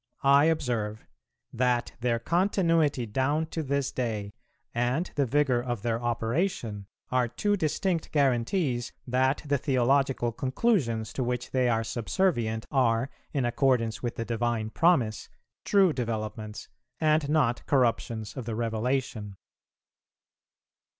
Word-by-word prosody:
I 140 +1 +6
observe, 120 -9 -1 0.5
That 125 0 +1
their 120 -1 +1
continuity 165 - +1
down 135 +8 0
to 165 - -2
this 140 -2 -1
day, 105 -5 -3 0.4
and 125 +9 0
the 140 -3 +1
vigour 135 -2 +2
of 120 -4 -4
their 115 -1 -1
operation, 115 - -1 0.2
are 125 -1 +2
two 205 - 0
distinct 170 0 -1
guarantees 130 -1 +1
that 130 +2 +1
the 140 -1 +1
theological 135 -1 +2
conclusions 130 - 0
to 130 - -1
which 125 0 -3
they 130 -2 +2
are 115 -1 +1
subservient 115 - 0
are, 125 -2 +2 0.2
in 135 -4 0
accordance 120 -2 +1
with 120 -1 -3
the 115 - -3
Divine 115 -1 -1
Promise, 130 - +2 0.4
true 195 -5 +4
developments, 110 -3 -4 0.3
and 155 -2 +2
not 145 -6 +2
corruptions 115 -4 0
of 130 -4 -5
the 115 -1 -3
Revelation. 115 -2 -2
125 Hz, 125 wpm, -28 LUFS, 115-145 Hz, 0.5 s, I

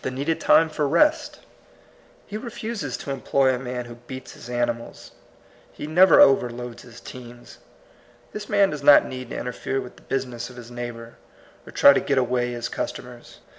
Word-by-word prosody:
17 130 0 -4
needed 155 +4 -1
tiine 160 -1 +4
for 150 -1 -1
rest; 300 - +2 0.8
he 210 - -9
refuses 220 - -5
to 140 - -6
employ 135 0 +1
a 125 - -3
man 125 -1 -5
who 120 - -10 0.2
beats 130 -1 -8
his 120 - -12
animals; 120 -1 -3 0.6
he - - -8
never 180 +5 +5
overloads 120 -2 +3
his 115 -1 -14
teams. 120 -1 -12 0.7
This 210 0 -7
man 200 -2 +3
does 150 - -5
not 145 0 +7
need 130 0 -7
to - - -5
interfere 125 +2 -3
with 125 - -9
the - - -17
business 125 -3 -4
of 125 - -13
his 120 -1 -11
neighbor, 120 -1 -8 0.5
or - - -10
try 140 - +7
to - - +2
get 140 - -1
away 125 -1 0
his 120 0 -4
customers. 120 -1 -7
130 Hz, 175 wpm, -23 LUFS, 120-145 Hz, 0.8 s, not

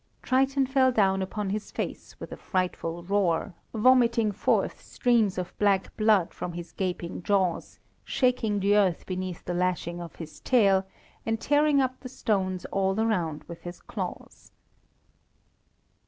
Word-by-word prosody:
Triton 270 +1 +2
fell 260 0 +3
down 195 -4 +2
upon 195 +1 -3
his 210 +1 -3
face - - -6
with - - -8
a - - -5
frightful 175 -2 -2
roar, 185 -1 0 0.2
vomiting 235 -1 +4
forth 205 - 0
streams 230 -6 +1
of 180 -1 -4
black 200 -2 +2
blood 215 -5 +3
from 175 - -5
his 170 -1 -7
gaping 180 -3 -3
jaws, 190 -2 0 0.3
shaking 245 -5 +1
the 200 +1 +3
earth 190 -5 +2
beneath 185 -1 -5
the 175 - -2
lashing 175 -1 -1
of 170 - -9
his 160 -2 -9
tail, 195 -6 +3 0.4
and 225 0 -1
tearing 290 +1 +3
up 255 -1 -1
the 255 - -8
stones 190 -7 -1
all 195 +1 +1
around 175 -9 0
with 170 -1 -10
his 175 0 -8
claws. - - -7
195 Hz, 145 wpm, -27 LUFS, 180-230 Hz, 0.4 s, vomiting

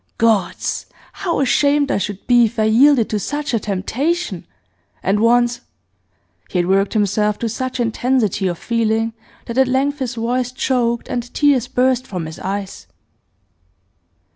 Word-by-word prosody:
Gods! 215 -6 0 0.3
how 345 -6 -2
ashamed 285 +1 +2
I - - +1
should 205 -1 -5
be 240 -1 +5
if 225 +2 -5
I 220 - +2
yielded 235 +2 +5
to 210 - 0
such 290 +5 -3
a 230 - +2
temptation! 265 - -2 0.6
And 200 +2 +1
once 240 +1 +3 0.4
' - - -41
He - - -2
had 175 - +2
worked 195 +2 +1
himself 210 0 +1
to 235 - -2
such 255 +3 -4
intensity 230 -4 0
of 175 -2 -2
feeling 225 0 0 0.3
that 235 +2 -2
at 265 - +4
length 275 +3 0
his 255 -2 -3
voice 245 +2 -1
choked 245 -2 0
and 245 -1 -4
tears 280 -5 +3
burst 255 0 +1
from 180 -5 -4
his 160 0 -8
eyes. 190 - -5
235 Hz, 155 wpm, -19 LUFS, 210-260 Hz, 0.6 s, be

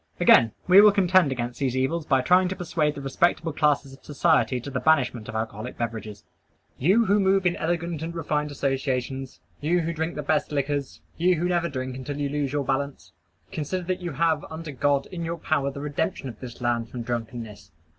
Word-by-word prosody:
Again: 115 -1 +6 0.2
we 185 +2 +9
will 210 0 +8
contend 185 -6 +3
against 120 -1 -4
these 130 -2 0
evils 150 +5 -1
by 135 -2 +3
trying 180 +7 +4
to 185 - -3
persuade 160 -4 -1
the 140 - -6
respectable 165 +3 +1
classes 145 -3 +1
of 135 - -16
society 145 -3 +2
to 140 +4 -8
the 130 - -1
banishment 130 -8 +1
of - - -6
alcoholic 110 +1 -4
beverages. 110 -3 -5 0.6
You 195 - +4
who 205 +1 +3
move 195 -1 +2
in 175 - +2
elegant 170 -1 -2
and 165 +1 -5
refined 150 -2 -1
associations; 135 -2 -2 0.2
you 170 +4 +1
who 165 +1 -2
drink 160 +1 -3
the 150 - -4
best 150 +1 0
liquors; 140 -1 -2 0.2
you 180 +2 +3
who 170 +2 -1
never 175 -1 0
drink 130 -2 -4
until 135 +2 -5
you 145 -1 -1
lose 145 -2 -2
your 145 -1 -1
balance: 140 +1 -3 0.4
consider 175 +5 -3
that 185 +1 -3
you 175 -3 -4
have, 160 0 +1
under 160 0 -7
God, 140 +1 +1
in 170 -2 -5
your 165 +1 -3
power 150 -3 0
the 140 0 -7
redemption 145 -1 -2
of 115 - -11
this 125 -2 -9
land 120 -1 0
from 120 -2 -6
drunkenness. 115 -2 -5
145 Hz, 205 wpm, -25 LUFS, 130-170 Hz, 0.6 s, we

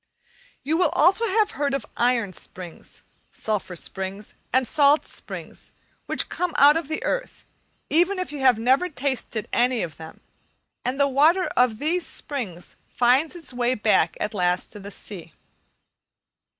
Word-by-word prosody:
You 310 +4 +1
will 355 -3 +3
also 385 +8 +4
have 425 +1 +2
heard 280 0 -1
of 275 - -4
iron 235 -5 +1
springs, 180 -1 -10 0.3
sulphur 210 -4 -3
springs, 190 +4 -5 0.2
and 260 -1 +2
salt 290 +3 +4
springs, - - -8 0.3
which - - +1
come 360 -2 -3
out 290 +2 +7
of 325 -3 -2
the 315 +1 -3
earth, - - -3 0.4
even 355 +5 +2
if 365 -3 -3
you 295 - -6
have 260 -3 +4
never 260 +10 +2
tasted 260 - -3
any 245 0 +2
of 160 -4 -7
them, 160 0 -11 0.6
and 255 +3 -2
the 280 - +4
water 310 +7 +4
of 250 -1 +4
all - - -12
these 330 +7 0
springs 220 - -5
finds 260 +7 +2
its 325 -6 -8
way 245 +1 +1
back 215 -1 +2
at 210 - -2
last 180 -2 0
to 210 - -10
the 200 0 -8
sea. 185 -4 -6
260 Hz, 160 wpm, -24 LUFS, 210-315 Hz, 0.6 s, out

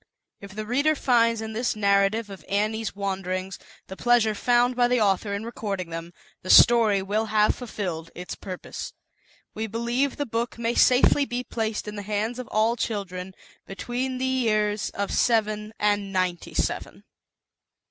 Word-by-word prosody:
If 200 -1 -11
the 215 0 -4
reader 285 +7 +2
finds 230 -4 +2
in 220 0 -5
this 235 +2 -1
narrative 200 +1 +2
of 195 - -10
Annie's 215 +2 -1
Wanderings, 190 -1 -3 0.3
the 190 - -9
pleasure 235 -1 +3
found 245 +3 +2
by 245 0 +3
the 250 0 +2
author 200 0 +1
in 205 +2 -5
recording 200 -7 -4
them, 165 +1 -6 0.3
the 185 - -9
story 220 -5 +6
will 210 +3 0
have 215 -1 +3
fulfilled 180 -9 -5
its 180 0 -6
purpo; 185 -2 -7 0.6
We 220 +1 -3
believe 235 +5 -1
the 290 - -1
book 235 0 -3
may 235 0 -1
safely 255 +3 +4
be 245 -1 -3
placed 220 -3 -3
in 210 0 -6
the - - -4
hands 215 +4 -2
of 250 - -6
all 220 +2 +1
children 190 -5 -4 0.3
between 250 +6 -3
the 260 - -1
years 215 -5 +1
of 200 0 -4
seven 215 -2 +1
^ 205 0 +2
ninety 185 -3 -2
seven. - - -2
215 Hz, 160 wpm, -25 LUFS, 200-240 Hz, 0.6 s, story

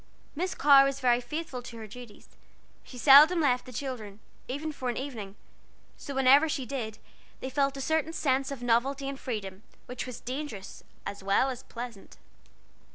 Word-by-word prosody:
Miss 365 +5 -2
Carr 280 -1 +7
was 275 0 -1
very 245 -1 +3
faithful 270 0 -5
to 235 -1 -10
her 220 - -7
duties: 225 0 -12 0.5
she 250 - -12
seldom 295 +7 +8
left 255 -4 +1
the - - -8
children, 220 -5 -6 0.3
even 290 +5 -4
for 260 -4 -4
an 240 - -3
evening, 225 -8 -6 0.6
so 280 - -8
whenever 270 +4 +5
she 270 -3 -2
did, 225 -4 -5 0.4
they 260 - -5
felt 275 +1 +1
a - - -4
certain 315 +2 0
sense 275 -4 0
of 275 -3 -6
novelty 265 +4 +1
and 275 0 -5
freedom, 200 -5 -5 0.2
which 250 +1 -6
was 250 - -7
dangerous 255 -6 -6 0.2
as 200 - -6
well 200 +7 +2
as 250 - -7
pleasant. 235 -4 -9
260 Hz, 170 wpm, -29 LUFS, 235-280 Hz, 0.6 s, seldom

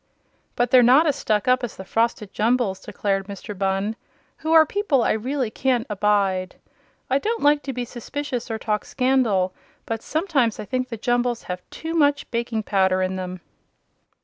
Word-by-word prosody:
"But 245 0 0
they're 255 - +8
not 260 +7 +6
as 295 -3 +2
stuck 215 +2 0
up 255 0 +3
as 240 - -4
the 190 - -8
Frosted 225 -1 -1
Jumbles," 225 -3 +1
declared 195 -1 -2
Mr. 200 +1 -7
Bunn, 195 +3 -1 0.4
"who 315 0 -3
are 320 -1 +8
people 310 - +1
I - - +2
really 250 +1 -1
can't 250 -1 0
abide. 195 -3 +1 0.5
I 270 +2 +2
don't 450 +7 -2
like 290 0 +4
to 275 - -4
be 250 -1 -3
suspicious 250 +1 -5
or 225 - -2
talk 210 -1 -1
scandal, 240 -8 +1 0.3
but 225 -1 -3
sometimes 290 - 0
I - - -5
think 255 +4 -2
the 230 - -5
Jumbles 240 +1 0
have 180 0 -5
too 325 +1 -6
much 290 -3 +2
baking 235 -2 -2
powder 190 -2 +2
in 185 0 -1
them." 185 -1 -5
235 Hz, 175 wpm, -23 LUFS, 200-265 Hz, 0.5 s, they're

